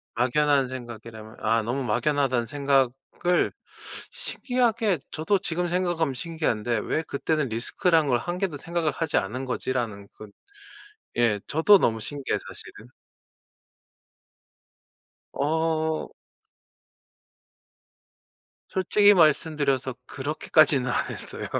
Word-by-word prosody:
막연한 135 Hz, +2 st, +2 dB
생각이라면 115 Hz, -3 st, -9 dB
아 115 Hz, +1 st, +2 dB
'너무 125 Hz, +5 st, -2 dB
막연하다.'는 130 Hz, -1 st, +1 dB
생각을 140 Hz, +5 st, 0 dB, 0.6 s
신기하게 230 Hz, -, 0 dB
저도 190 Hz, +6 st, 0 dB
지금 175 Hz, -1 st, -2 dB
생각하면 175 Hz, -5 st, 0 dB
신기한데 125 Hz, -7 st, -1 dB
'왜 160 Hz, -, -1 dB
그때는 150 Hz, -1 st, -1 dB
리스크라는 150 Hz, +7 st, +1 dB
걸 120 Hz, -, +3 dB
1 175 Hz, +8 st, -4 dB
개도 185 Hz, -7 st, -2 dB
생각을 165 Hz, +1 st, -1 dB
하지 160 Hz, -2 st, -1 dB
않은 125 Hz, +7 st, -3 dB
거지?'라는 120 Hz, -5 st, -3 dB
그 110 Hz, -, -11 dB, 0.9 s
예. 115 Hz, -4 st, +2 dB
저도 165 Hz, +7 st, +6 dB
너무 110 Hz, -1 st, +1 dB
신기해요 140 Hz, +3 st, -2 dB
사실은. 110 Hz, +3 st, -11 dB, 2.5 s
어. 160 Hz, +1 st, 0 dB, 2.6 s
솔직히 205 Hz, +2 st, +4 dB
말씀드려서 145 Hz, -6 st, +2 dB
그렇게까지는 145 Hz, -2 st, +2 dB
안 -, -, -1 dB
했어요. -, -, -6 dB
145 Hz, 250 characters per minute, -25 LUFS, 120-165 Hz, 2.6 s, 저도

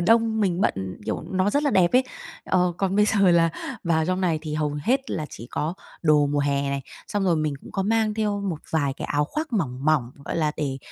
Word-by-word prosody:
đông 225 Hz, +3 st, +3 dB
mình 185 Hz, -3 st, +1 dB
bận, 95 Hz, -, -1 dB
kiểu, -, -, -2 dB
nó 185 Hz, +2 st, +1 dB
rất 285 Hz, +6 st, +1 dB
là 285 Hz, -, +2 dB
đẹp 180 Hz, -7 st, +3 dB
ấy. 255 Hz, +1 st, +5 dB, 0.4 s
Ờ, 180 Hz, -1 st, +2 dB
còn 195 Hz, 0 st, 0 dB
bây 210 Hz, -, +5 dB
giờ 210 Hz, -1 st, +1 dB
là 165 Hz, -1 st, +4 dB, 0.3 s
vào 160 Hz, -2 st, +2 dB
trong 185 Hz, 0 st, 0 dB
này 170 Hz, -4 st, +1 dB
thì 155 Hz, -1 st, -4 dB
hầu 150 Hz, -1 st, -1 dB
hết 265 Hz, -, +1 dB
là 155 Hz, -, -2 dB
chỉ 115 Hz, -, -9 dB
có 160 Hz, +4 st, -2 dB, 0.3 s
đồ 150 Hz, -3 st, +4 dB
mùa 145 Hz, 0 st, 0 dB
hè 140 Hz, -1 st, 0 dB
này, 140 Hz, 0 st, -2 dB, 0.3 s
xong 205 Hz, -1 st, -1 dB
rồi 175 Hz, -3 st, +3 dB
mình 155 Hz, -2 st, 0 dB
cũng -, -, -12 dB
có 195 Hz, -, 0 dB
mang 220 Hz, +1 st, +1 dB
theo 210 Hz, -2 st, 0 dB
một 190 Hz, -6 st, -2 dB
vài 145 Hz, -4 st, +1 dB
cái -, -, -6 dB
áo 145 Hz, 0 st, +1 dB
khoác 310 Hz, -, -4 dB
mỏng, 135 Hz, -, -1 dB
mỏng, 150 Hz, -6 st, +2 dB
gọi -, -, -3 dB
là, 155 Hz, -2 st, +1 dB
để 135 Hz, -3 st, -2 dB
170 Hz, 240 wpm, -24 LUFS, 150-205 Hz, 0.4 s, ấy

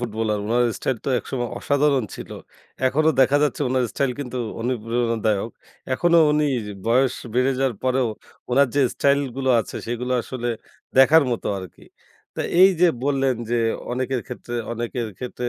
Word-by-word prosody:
Footballer. 110 Hz, -2 st, -2 dB
উনার 120 Hz, +3 st, +2 dB
style 130 Hz, -, -1 dB
তো -, -, +1 dB
একসময় 120 Hz, -1 st, -4 dB
অসাধারণ 140 Hz, -3 st, +2 dB
ছিল। -, -, -9 dB, 0.6 s
এখনো 155 Hz, +4 st, +2 dB
দেখা 135 Hz, +2 st, +5 dB
যাচ্ছে 150 Hz, -, 0 dB
উনার 130 Hz, 0 st, +1 dB
স্টাইল 135 Hz, -2 st, 0 dB
কিন্তু 125 Hz, -2 st, -5 dB, 0.2 s
অনুপ্রেরণাদায়ক। 115 Hz, -2 st, -1 dB, 0.4 s
এখনো 170 Hz, +3 st, +3 dB
উনি 150 Hz, 0 st, +2 dB, 0.4 s
বয়স 130 Hz, +2 st, +3 dB, 0.2 s
বেড়ে 125 Hz, +2 st, +3 dB
যাওয়ার 135 Hz, -2 st, +1 dB
পরেও 130 Hz, -1 st, +2 dB, 0.4 s
উনার 135 Hz, +2 st, +4 dB
যে 145 Hz, -, +3 dB
স্টাইল 140 Hz, 0 st, +3 dB, 0.2 s
গুলো 130 Hz, -1 st, 0 dB
আছে -, -, -7 dB
সেগুলো 120 Hz, +2 st, -3 dB
আসলে 120 Hz, 0 st, -4 dB, 0.5 s
দেখার 155 Hz, +4 st, +7 dB
মতো 120 Hz, -, -3 dB
আরকি। 95 Hz, -1 st, -11 dB, 0.5 s
তো -, -, -4 dB, 0.2 s
এই 190 Hz, -, +9 dB
যে 180 Hz, -, +6 dB, 0.2 s
বললেন 135 Hz, -2 st, +1 dB, 0.2 s
যে 120 Hz, -, +2 dB, 0.3 s
অনেকের 130 Hz, 0 st, -1 dB
ক্ষেত্রে, 125 Hz, -1 st, -7 dB, 0.2 s
অনেকের 120 Hz, 0 st, -3 dB
ক্ষেত্রে 125 Hz, -1 st, -4 dB
125 Hz, 150 wpm, -22 LUFS, 120-135 Hz, 0.6 s, এই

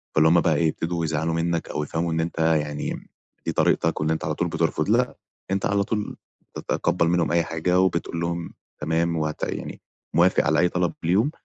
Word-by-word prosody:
فاللي 80 Hz, +1 st, +5 dB
هُم 85 Hz, +1 st, +5 dB
بقى 80 Hz, -, +2 dB
إيه 80 Hz, +2 st, +2 dB
يبتدوا 85 Hz, +1 st, -2 dB
يزعلوا 80 Hz, +1 st, -1 dB
منّك 85 Hz, 0 st, -1 dB
أو 75 Hz, -, -2 dB
يفهموا 80 Hz, +3 st, -2 dB
إن 80 Hz, -, 0 dB
أنت 85 Hz, 0 st, -4 dB
يعني 75 Hz, -2 st, 0 dB, 0.4 s
دي -, -, 0 dB
طريقتك 80 Hz, -1 st, +1 dB
وإن 75 Hz, -, +1 dB
أنت 80 Hz, -, -1 dB
على -, -, -1 dB
طول -, -, 0 dB
بترفض -, -, 0 dB
لأ -, -, +2 dB, 0.3 s
أنت 95 Hz, 0 st, 0 dB
على 100 Hz, 0 st, +2 dB
طول 105 Hz, +1 st, -3 dB, 0.4 s
تتقبل 85 Hz, -, 0 dB
منهم 85 Hz, -1 st, +2 dB
أي 85 Hz, 0 st, +3 dB
حاجة 85 Hz, +3 st, 0 dB
وبتقول 85 Hz, -2 st, 0 dB
لهم 85 Hz, 0 st, -3 dB, 0.3 s
تمام 80 Hz, +2 st, 0 dB
و 80 Hz, -, 0 dB
هت 75 Hz, -, -6 dB
يعني -, -, -4 dB, 0.3 s
موافق 90 Hz, +3 st, +4 dB
على 80 Hz, 0 st, +3 dB
أي 90 Hz, -, +4 dB
طلب 90 Hz, -1 st, 0 dB
ليهم، 100 Hz, -, +2 dB
85 Hz, 200 wpm, -24 LUFS, 80-85 Hz, 0.4 s, فاللي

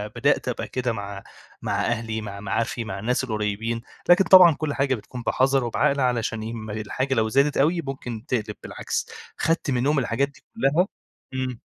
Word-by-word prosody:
بدأت 135 Hz, +2 st, +2 dB
أبقى 125 Hz, -, -2 dB
كده 125 Hz, -2 st, -1 dB
مع 100 Hz, -2 st, -6 dB, 0.4 s
مع -, -, -1 dB
أهلي، 110 Hz, -1 st, -2 dB
مع 100 Hz, -1 st, -7 dB
معارفي، 115 Hz, +4 st, -2 dB
مع 95 Hz, -2 st, -5 dB
الناس 125 Hz, +5 st, 0 dB
القريِّبين، 110 Hz, 0 st, -2 dB, 0.3 s
لكن 180 Hz, +2 st, +7 dB
طبعًا 175 Hz, -3 st, +8 dB
كل 155 Hz, -2 st, -2 dB
حاجة 135 Hz, -1 st, +1 dB
بتكون 120 Hz, +3 st, -8 dB
بحذر 135 Hz, +2 st, +2 dB
وبعقل، 140 Hz, +4 st, +1 dB
علشان 115 Hz, -3 st, 0 dB
يهم 110 Hz, -1 st, -6 dB
الحاجة 110 Hz, +6 st, -2 dB
لو 110 Hz, -2 st, +1 dB
زادت 140 Hz, +4 st, +3 dB
أوي 165 Hz, +5 st, +3 dB
ممكن 125 Hz, -4 st, -6 dB
تقلِب 110 Hz, -5 st, -2 dB
بالعكس، -, -, -3 dB, 0.3 s
اخدت 165 Hz, -3 st, +1 dB
منهم 135 Hz, +4 st, +2 dB
الحاجات 125 Hz, +3 st, +1 dB
دي 140 Hz, -, -19 dB
كلها 155 Hz, +8 st, +2 dB, 0.5 s
امم. 130 Hz, -2 st, -3 dB
125 Hz, 170 wpm, -24 LUFS, 110-140 Hz, 0.5 s, طبعًا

